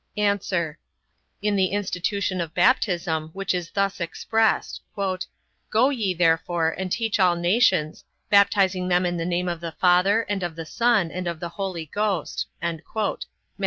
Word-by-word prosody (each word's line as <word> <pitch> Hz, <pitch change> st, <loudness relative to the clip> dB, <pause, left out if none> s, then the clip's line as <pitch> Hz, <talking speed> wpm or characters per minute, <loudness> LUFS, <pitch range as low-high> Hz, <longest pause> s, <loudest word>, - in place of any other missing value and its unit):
A. 195 Hz, -6 st, 0 dB, 0.7 s
In 210 Hz, -1 st, +1 dB
the 190 Hz, -1 st, +3 dB
institution 195 Hz, -1 st, -1 dB
of 165 Hz, -1 st, -6 dB
baptism, 175 Hz, -7 st, +2 dB
which 195 Hz, 0 st, -2 dB
is 175 Hz, -2 st, -3 dB
thus 195 Hz, -2 st, -1 dB
expressed: 220 Hz, +6 st, 0 dB, 0.9 s
"Go 240 Hz, +5 st, +4 dB
ye, 210 Hz, -9 st, -1 dB
therefore, 165 Hz, 0 st, +2 dB
and 190 Hz, -1 st, -4 dB
teach 225 Hz, 0 st, 0 dB
all 180 Hz, -2 st, +4 dB
nations, 175 Hz, -3 st, +2 dB, 0.2 s
baptizing 200 Hz, -2 st, +3 dB
them 180 Hz, 0 st, +2 dB
in 175 Hz, 0 st, -1 dB
the 165 Hz, 0 st, -2 dB
name 180 Hz, 0 st, -1 dB
of 170 Hz, -1 st, -2 dB
the 165 Hz, -1 st, -5 dB
Father, 185 Hz, +6 st, +3 dB
and 205 Hz, -3 st, -3 dB
of 175 Hz, -2 st, -3 dB
the 165 Hz, -1 st, -6 dB
Son, 225 Hz, -3 st, +2 dB
and 180 Hz, 0 st, -4 dB
of 170 Hz, -2 st, -3 dB
the 170 Hz, -, -4 dB
Holy 185 Hz, -3 st, -4 dB
Ghost", 200 Hz, 0 st, -2 dB, 0.2 s
Matt. 170 Hz, +6 st, -3 dB
185 Hz, 155 wpm, -24 LUFS, 170-200 Hz, 0.9 s, Go